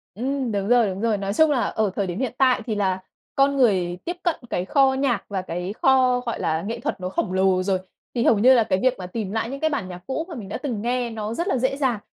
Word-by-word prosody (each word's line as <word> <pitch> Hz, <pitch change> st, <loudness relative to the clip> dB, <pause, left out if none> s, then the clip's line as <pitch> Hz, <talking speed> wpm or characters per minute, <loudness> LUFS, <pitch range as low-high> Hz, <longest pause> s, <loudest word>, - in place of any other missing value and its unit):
Ừm, 260 Hz, +2 st, -2 dB
đúng 200 Hz, -1 st, -1 dB
rồi, 240 Hz, -3 st, +5 dB
đúng 190 Hz, +1 st, -5 dB
rồi. 225 Hz, -2 st, +1 dB
Nói 195 Hz, 0 st, -3 dB
chung 315 Hz, +5 st, +4 dB
là 255 Hz, -5 st, +2 dB
ở 215 Hz, -3 st, 0 dB
thời 200 Hz, -, -1 dB
điểm 175 Hz, +3 st, -4 dB
hiện 255 Hz, -3 st, -2 dB
tại 255 Hz, -2 st, +3 dB
thì 220 Hz, -, -2 dB
là 190 Hz, -2 st, 0 dB, 0.4 s
con 275 Hz, +1 st, +3 dB
người 185 Hz, -8 st, +2 dB
tiếp 350 Hz, -, -3 dB
cận 345 Hz, -3 st, +1 dB
cái 180 Hz, -, -1 dB
kho 270 Hz, +5 st, +3 dB
nhạc 265 Hz, -6 st, 0 dB
và 195 Hz, -2 st, -2 dB
cái 180 Hz, +2 st, -4 dB
kho, 255 Hz, -2 st, +4 dB
gọi 235 Hz, -, -3 dB
là, 160 Hz, +1 st, 0 dB
nghệ 225 Hz, +4 st, -4 dB
thuật -, -, -3 dB
nó 185 Hz, -, -3 dB
khổng 185 Hz, 0 st, -2 dB
lồ 190 Hz, -1 st, +2 dB
rồi, 190 Hz, -1 st, +1 dB, 0.4 s
thì 235 Hz, -, +1 dB
hầu 220 Hz, -, +4 dB
như 255 Hz, +5 st, +7 dB
là 240 Hz, -3 st, +5 dB
cái 190 Hz, -3 st, 0 dB
việc 255 Hz, -1 st, +3 dB
mà 180 Hz, -, -6 dB
tìm 200 Hz, 0 st, -4 dB
lại 225 Hz, +2 st, -2 dB
những 275 Hz, +1 st, -5 dB
cái 315 Hz, -, +1 dB
bản 250 Hz, -11 st, -2 dB
nhạc 180 Hz, -1 st, -8 dB
cũ 290 Hz, +5 st, -2 dB
mà 335 Hz, -, -6 dB
mình 205 Hz, -5 st, -8 dB
đã -, -, -3 dB
từng 245 Hz, -8 st, -4 dB
nghe 245 Hz, +1 st, -1 dB
nó 220 Hz, 0 st, -4 dB
rất 340 Hz, -, -2 dB
là 385 Hz, -, +1 dB
dễ 260 Hz, +2 st, 0 dB
dàng. 255 Hz, -7 st, 0 dB
225 Hz, 280 wpm, -23 LUFS, 195-260 Hz, 0.4 s, như